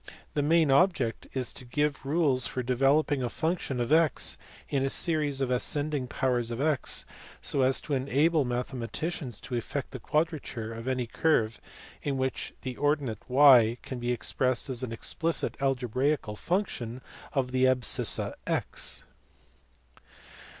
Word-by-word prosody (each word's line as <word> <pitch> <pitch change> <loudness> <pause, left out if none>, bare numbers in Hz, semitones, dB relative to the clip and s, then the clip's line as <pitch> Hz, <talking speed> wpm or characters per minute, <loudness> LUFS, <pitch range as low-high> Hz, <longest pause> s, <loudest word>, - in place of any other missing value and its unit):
The 145 - +1
main 160 0 +3
object 140 -6 +2
is 130 -2 -1
to - - -11
give 140 +2 -1
rules 140 -5 +3
for 130 - -3
developing 135 +3 +2
a 125 - -1
function 160 -3 -2
of 120 +3 -1
a? 160 0 +6 0.6
in 135 -2 0
a 135 - +1
series 150 -3 +1
in 130 -2 0
ascending 145 +2 0
powers 125 -2 0
of 120 0 -4
x, 150 -1 0 0.3
so 140 - 0
as 130 0 +3
to 150 - -4
enable 140 +4 +2
mathematicians 125 +2 -3
to 120 +2 -9
effect 125 +3 -3
the 130 - -7
quadrature 145 -6 -2
of 115 +2 -8
any 130 -2 0
curve 115 -3 +1 0.4
in 140 -2 -2
which 130 0 -2
the 130 -2 -5
ordinate 145 -6 0
y 125 -4 +7
can 130 - -6
be 120 0 -1
ex 120 - -3
pressed 130 +1 +1
as 125 -1 +1
an 130 -3 -4
explicit 165 +8 -1
algebraical 130 -2 0
function 130 - -2 0.3
of 130 -3 0
the 130 0 +3
abscissa 130 -2 +2
x. - - -1
130 Hz, 150 wpm, -28 LUFS, 125-150 Hz, 0.6 s, y